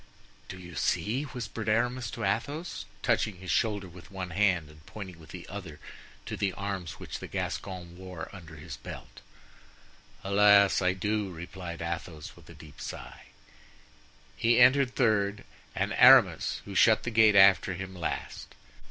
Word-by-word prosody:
"Do 95 - -7
you 90 -1 -11
see?" 125 - -1
whispered 115 -5 -5
Aramis 120 +1 0
to - - -6
Athos, 140 - -3 0.2
touching 105 -3 +1
his 95 0 -6
shoulder 105 -4 0
with 90 0 -14
one 95 -2 -6
hand 90 -4 +1
and 75 0 -17
pointing 95 -5 -9
with 80 - -15
the 90 -2 -9
other 95 -7 -8 0.5
to - - -5
the 100 -2 -1
arms 95 -6 -4
which - - -8
the - - -8
Gascon 90 -3 -5
wore 90 -2 -8
under 85 -5 -11
his 75 - -9
belt. - - -10 1.0
"Alas! 100 0 +5
I 90 0 +2
do!" 105 +1 -2
replied 85 0 -7
Athos, 85 -2 -6
with - - -18
a - - -12
deep 75 -2 -14
sigh. - - -8 1.1
He 115 +1 +3
entered 130 +1 +5
third, 105 -4 +1 0.3
and - - -1
Aramis, - - +5
who 100 - -8
shut 110 +4 +4
the 120 - -3
gate 110 -2 +5
after 95 -1 +6
him, 95 +1 -7
last. 85 - -5
95 Hz, 155 wpm, -29 LUFS, 90-110 Hz, 1.1 s, after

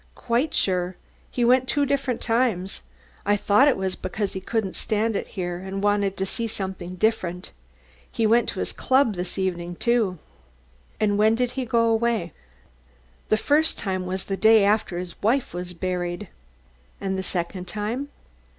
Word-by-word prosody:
"Quite 245 +5 0
sure. 180 -1 +1 0.3
He 245 - 0
went 255 +1 +4
two 290 +1 +2
different 270 -3 -1
times. 225 -6 0 0.4
I 205 +1 +2
thought 205 +7 +4
it 280 - +3
was 190 -1 -1
because 195 +2 -3
he 190 - -4
couldn't 205 -1 -2
stand 220 +1 0
it - - -2
here 175 -1 -2
and 190 +1 -5
wanted 205 -1 +1
to 190 - 0
see 230 +4 -2
something 190 -4 -5
different. 185 -4 -1 0.6
He 225 - 0
went 230 +2 +4
to - - -4
his - - -2
club 260 -4 +3
this 180 0 -4
evening, 175 -2 -2
too." 225 -4 +1 0.8
"And 205 -1 +2
when 220 +1 +5
did 245 +1 0
he 260 0 -3
go 230 0 +2
away?" 225 -5 +1 1.0
"The 215 - +4
first 300 +7 +2
time 185 -2 -2
was 185 +1 -3
the 195 - -2
day 220 -1 +6
after 205 -3 +1
his 180 -1 -6
wife 240 +2 +1
was 180 0 -5
buried." 180 +1 -3 0.7
"And 190 -1 -2
the 190 - -1
second 180 0 -3
time?" 220 +9 -3
205 Hz, 170 wpm, -24 LUFS, 185-230 Hz, 1.0 s, day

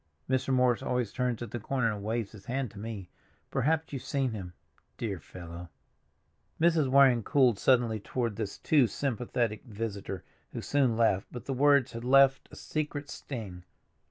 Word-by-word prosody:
Mr. 130 +1 0
Morris 125 -2 +3
always 125 -5 -1
turns 125 -2 -1
at 115 - -8
the 120 - -3
corner 120 0 0
and 100 -1 -7
waves 110 0 -2
his 105 -3 -13
hand 130 -2 -2
to 100 - -11
me; 105 -4 -6 0.4
perhaps 160 +3 0
you've 135 - -3
seen 135 -2 -1
him—dear 95 +1 -7
fellow!" 85 +1 -9 0.9
Mrs. 160 -4 +3
Waring 130 -3 +6
cooled 125 -3 +3
suddenly 120 -4 +3
toward 115 +1 -2
this 105 -2 -4
too 145 -6 +4
sympathetic 120 -2 -2
visitor, 100 -4 -5 0.3
who - - -4
soon 130 -5 +2
left, 105 -4 +2
but 120 - -8
the 135 - -2
words 140 -1 +4
had 115 0 -6
left 135 +1 +5
a - - -11
secret 145 -2 -4
sting. 100 -9 -7
120 Hz, 160 wpm, -30 LUFS, 105-135 Hz, 0.9 s, Waring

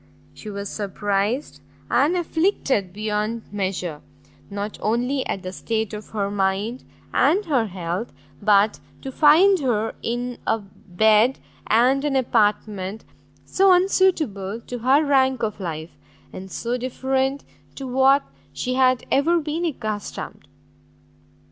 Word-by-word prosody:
She 215 - -9
was 200 0 -5
surprised 205 +5 -2 0.3
and 310 +6 +2
afflicted 320 - 0
beyond 215 +2 -2
measure, 185 -6 -3 0.5
not 205 +1 -5
only 250 +5 0
at 195 - -3
the 185 - -5
state 220 0 -2
of 210 0 -7
her 200 -2 -2
mind, 205 +5 -1 0.3
and 405 +4 +3
her 260 -9 +1
health, 180 +3 -4 0.3
but 205 0 +3 0.2
to 270 - -5
find 335 +8 +5
her 225 -6 0
in 245 +1 -3
a 225 - +2
bed 215 +4 +2 0.3
and 255 +5 +3
an 290 -2 0
apartment 210 -4 0 0.4
so 385 0 +4
unsuitable 320 - +2
to 245 +1 -7
her 270 +6 +3
rank 265 -3 +2
of 215 -1 -2
life, 165 -3 -5 0.4
and 190 +1 -8
so 240 +5 -3
different 265 +2 -1 0.3
to 270 - -6
what 265 +2 +4 0.3
she 255 - -3
had 255 -1 +3
ever 330 +5 +3
been 315 +2 -3
accustomed. 215 -9 -5
230 Hz, 125 wpm, -23 LUFS, 205-270 Hz, 0.5 s, find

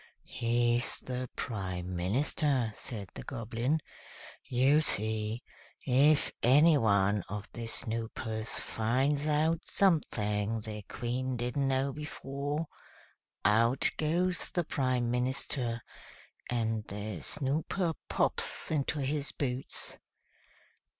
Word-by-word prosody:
"He's 120 +1 +2
the 125 0 -5
Prime 95 -5 -4
Minister," 125 - +1
said 105 -5 -5
the - - -7
Goblin. 120 +4 -2 0.6
"You 135 +5 +3
see, 110 -2 +1 0.4
if 140 +3 +4
any 150 +6 +6
one 100 -5 +3
of 105 +1 -5
the 115 -1 -5
Snoopers 115 0 0
finds 135 +6 0
out 155 +2 +2
something 110 - +1
the 105 0 -6
Queen 125 +2 -2
didn't 125 +3 -1
know 135 +1 +1
before, 145 +1 -4 0.8
out 115 +5 +4
goes 175 +3 0
the 175 - 0
Prime 130 -5 0
Minister, 125 -1 0 0.7
and 115 -2 0
the 100 -3 -5
Snooper 155 +5 -1 0.2
pops - - +1
into 150 0 0
his 140 +2 -1
boots. 130 -2 -4
125 Hz, 100 wpm, -31 LUFS, 110-145 Hz, 0.8 s, any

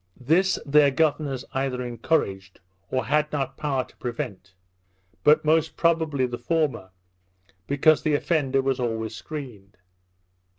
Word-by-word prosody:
This 170 +9 +2
their 145 0 +5
governors 145 -2 0
either 135 -1 -1
encouraged, 110 - -2 0.3
or 130 - -1
had 150 +2 +1
not 140 -3 -2
power 135 -4 -1
to - - -21
prevent; 100 -6 -6 0.7
but 150 +1 +5
most 160 +1 +2
probably 160 -5 +1
the 120 -1 -5
former, 150 - -1 0.8
because 145 +2 +4
the 155 -2 +1
offender 140 -4 +1
was 135 -1 0
always 115 -2 -2
screened. 110 - -9
135 Hz, 125 wpm, -25 LUFS, 125-155 Hz, 0.8 s, their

